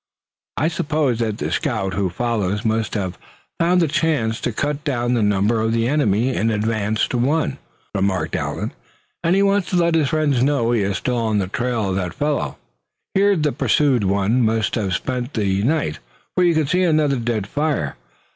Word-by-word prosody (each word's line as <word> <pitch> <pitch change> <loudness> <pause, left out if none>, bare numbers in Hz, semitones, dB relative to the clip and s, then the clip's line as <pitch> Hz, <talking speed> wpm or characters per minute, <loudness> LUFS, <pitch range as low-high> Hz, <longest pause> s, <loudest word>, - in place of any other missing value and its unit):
"I 155 - +2
suppose 150 -6 0
that 110 -3 -1
the - - -3
scout 95 -5 -1
who 100 -1 0
follows 105 0 -1
must 110 0 0
have 95 -4 -3 0.4
found 175 +1 +3
a - - +2
chance 140 -8 0
to 120 - -1
cut 145 +5 -2
down 125 -5 0
the 120 - +1
number 105 +2 +2
of 110 +1 0
the 115 0 +1
enemy 125 -3 +1
in 110 - +1
advance 110 -1 0
to 125 - -1
one," 140 +2 0 0.3
remarked 95 -2 0
Allan; - - -3 0.5
"and 170 +2 +3
he 195 - +3
wants 200 -2 +2
to - - -1
let 170 -1 +3
his 155 -4 +2
friend 145 -5 +1
know 130 -4 +2
he 115 -3 +2
is 100 0 0
still 125 -1 -1
on 110 -2 0
the 100 - +1
trail 115 -1 -1
of 95 - -1
that 90 -3 -3
fellow. 145 0 -1 0.6
Here 200 +1 +4
the 150 -4 +1
pursued 140 -3 +2
one 100 +5 +2
must 110 -3 +1
have 100 -5 0
spent 125 +1 -3
the 100 -3 +1
night, 135 - 0 0.3
for 180 - +2
you 170 -2 +3
can 155 -1 +2
see 180 +6 +1
another 155 -5 +2
dead 115 -4 -1
fire. 140 - -1
120 Hz, 195 wpm, -21 LUFS, 105-150 Hz, 0.6 s, Here